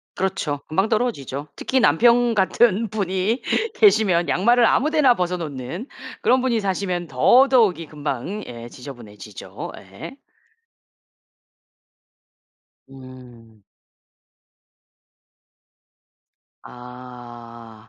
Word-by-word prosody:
그렇죠. 185 -7 -3
금방 190 +7 0
떨어지죠. 150 - -3
특히 260 0 -1
남편 235 +9 +3
같은 215 +2 +2
분이 200 +3 -2 0.3
계시면 200 -5 +3
양말을 235 +5 +3
아무 295 +6 +2
데나 295 -6 +4
벗어 180 -2 -2
놓는 155 - -7 0.3
그런 255 +2 +2
분이 235 -4 0
사시면 185 -3 -3
더더욱이 195 - +3
금방 150 - -5
예 120 -1 -9
지저분해지죠 115 -6 -10
예. 95 - -11 2.7
음. 125 -5 -15 3.0
아 120 -2 -13
175 Hz, 180 characters per minute, -21 LUFS, -, 3.0 s, 데나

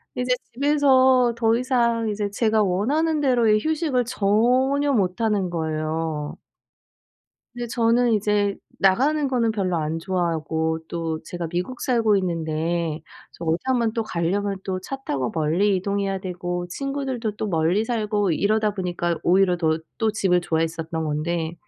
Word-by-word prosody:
이제 250 0 +1 0.2
집에서 260 -3 +4
더 225 -1 +3
이상 235 -3 +1
이제 205 -1 -2
제가 215 +1 +2
원하는 290 - +1
대로의 235 -6 +3
휴식을 310 -6 0
전혀 255 +6 +2
못하는 200 -2 0
거예요. 155 -2 -3 1.2
근데 240 0 -5
저는 235 +1 +2
이제 205 -1 +1 0.2
나가는 275 +10 +3
거는 235 -4 +1
별로 185 -4 -1
안 160 0 -2
좋아하고 160 -3 -1
또 165 -2 -3
제가 175 -1 -5
미국 180 +9 -4
살고 225 -5 +2
있는데 165 -2 -1 0.3
저 170 - -9
어디 165 +1 +1
한번 240 -4 +1
또 225 0 -1
가려면 195 +2 -1
또 185 -1 -3
차 270 - -5
타고 130 -3 -1
멀리 170 +6 +1
이동해야 195 +1 -1
되고 175 -1 -4
친구들도 270 -1 -3
또 - - -3
멀리 175 +3 +1
살고 210 -5 0
이러다 215 +5 +1
보니까 175 -3 -2
오히려 185 0 +3
더 160 -2 +1 0.2
또 220 -1 +2
집을 190 -4 +2
좋아했었던 165 -1 -2
건데 160 +2 -2
200 Hz, 295 characters per minute, -23 LUFS, 170-235 Hz, 1.2 s, 집에서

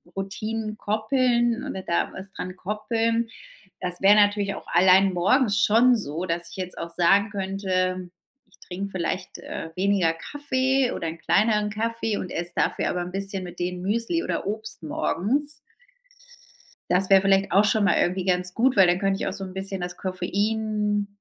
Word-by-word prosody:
Routinen 215 +3 -4
koppeln 235 +2 +1
oder 190 - -4
da 170 -2 -1
was 190 +1 -9
dran 185 0 -6
koppeln. 225 +4 -1 0.5
Das 180 -1 -3
wäre 200 +1 +7
natürlich 205 -1 +3
auch - - -10
allein 185 +2 +5
morgens 205 +5 +2
schon 235 +4 +5
so, 165 -2 -4
dass 170 -1 -3
ich - - -11
jetzt 185 -1 -6
auch 170 - -5
sagen 195 +5 +3
könnte: 185 -2 -2 0.4
„Ich 200 - -26
trinke 195 +2 -6
vielleicht, 185 0 -3
äh, 160 - -7
weniger 190 -3 +2
Kaffee 265 - 0
oder 165 - -4
'n 160 +1 -5
kleineren 210 +5 +2
Kaffee 225 0 -2
und 185 - -5
esse 175 +1 -4
dafür - - 0
aber 180 - -2
'n 175 +1 -5
bisschen 195 0 -3
mit 175 -1 -9
denen 180 0 -3
Müsli 230 - 0
oder - - -3
Obst 215 -4 -5
morgens.“ 240 - -1 1.4
Das 185 +2 +2
wäre 195 -1 +7
vielleicht 195 0 +2
auch 200 +4 +5
schon 215 0 +2
mal - - +3
irgendwie 185 +1 0
ganz 180 -1 0
gut, 250 +5 +2
weil 190 -2 +7
dann 175 +1 +2
könnte 195 0 0
ich - - -2
auch - - -2
so 195 - -6
'n 185 -1 -7
bisschen 190 0 -5
das 175 0 -5
Koffein 205 +2 -1
195 Hz, 175 wpm, -25 LUFS, 180-215 Hz, 1.4 s, wäre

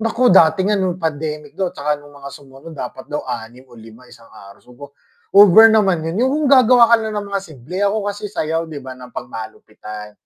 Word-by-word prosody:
Naku, 230 +3 +1
dati 180 -3 +5
nga 205 +2 +1
nung 185 -2 -2
pandemic 150 -1 -5
daw 190 -2 -2
'tsaka 150 +1 -2
nung 145 0 -17
mga 140 -1 -11
sumunod 140 +3 -14
dapat 130 +1 -8
daw 150 0 -5
6 120 0 -8
o - - -24
5, 115 +1 -15
isang 115 -2 -18
araw. 100 0 -16 0.7
Over 205 +3 +7
naman 190 -7 +1
yun, 165 +6 -3
yung 260 +1 +2
kung 300 0 -1
gagawa 250 -2 +6
ka - - +8
na 220 - -4
ng 205 - -3
mga 200 - -1
simple 155 -1 -11
ako 205 +1 +1
kasi 205 +1 -7
sayaw 165 -3 -3
di 155 - -9
ba 130 -1 -9
ng 125 -1 -13
pang-malupitan. 110 -2 -10
155 Hz, 205 wpm, -18 LUFS, 130-200 Hz, 0.7 s, ka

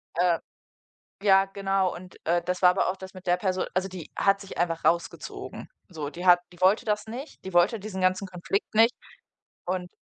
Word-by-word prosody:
Äh, 175 -1 +3 0.8
ja, 195 -1 +6
genau. 195 -1 0
Und, 180 +1 -11
äh, 175 +1 +2
das 180 +1 -3
war 180 - +8
aber 180 - +1
auch 190 - -4
das 190 0 -10
mit 185 0 -12
der 175 0 +3
Perso 185 -1 -1
also 190 +1 0
die 180 -4 -9
hat 195 0 +3
sich 195 - -9
einfach 165 -1 -1
rausgezogen. 170 0 -2 0.2
So, 155 -6 -5
die 175 +3 -6
hat 175 -1 +7
die 175 - -17
wollte 190 +3 +4
das 210 0 -1
nicht. 250 +7 -8
Die 190 - -6
wollte 175 +6 +3
diesen 195 -2 -5
ganzen 185 +2 +1
Konflikt 185 +4 -3
nicht, 225 +3 +5 0.7
und 180 0 -2
185 Hz, 200 wpm, -27 LUFS, 180-195 Hz, 0.8 s, war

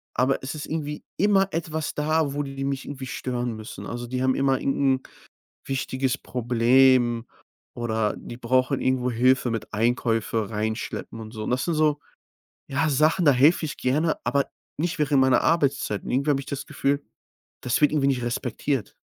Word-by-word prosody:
aber 130 +2 +2
es 135 +3 -5
ist 150 - -5
irgendwie 150 -2 -4
immer 195 -1 +4
etwas 160 -2 -2
da, 155 -1 +1
wo 145 - -1
die 135 -1 -5
mich 135 -1 -2
irgendwie 135 -2 -6
stören 120 -2 -3
müssen. 110 +1 -8
Also, 120 0 -5
die 125 +1 -2
haben 130 0 +3
immer 135 -1 +1
irgend 135 -1 +1
'n - - -16 0.6
wichtiges 130 -1 -1
Problem 120 0 +3 0.5
oder 110 -3 -1
die 120 - -9
brauchen 130 +2 +1
irgendwo 130 -1 +1
Hilfe 125 +1 +3
mit 115 -2 -4
Einkäufe 115 -1 0
rein 110 0 -1
schleppen 115 - -6
und 110 -1 -8
so. 110 -2 -6
Und - - -3
das 125 +1 0
sind 170 - 0
so, 150 -1 +2 0.7
ja, 145 +3 0
Sachen, 155 +6 +3
da 145 - +7
helfe 150 +6 +4
ich 145 - -5
gerne, 155 +5 +1
aber 140 -1 +2 0.3
nicht 165 +1 -2
während 140 -2 +3
meiner 130 -2 +4
Arbeitszeiten. 140 -10 0
Irgendwie 140 +4 +1
habe 135 - +1
ich - - -12
das 140 0 -4
Gefühl, 140 -1 -1 0.6
das 125 - 0
wird 150 - +5
irgendwie 145 -3 +2
nicht 130 -3 +1
respektiert. 125 +1 -2
130 Hz, 180 wpm, -25 LUFS, 120-145 Hz, 0.7 s, da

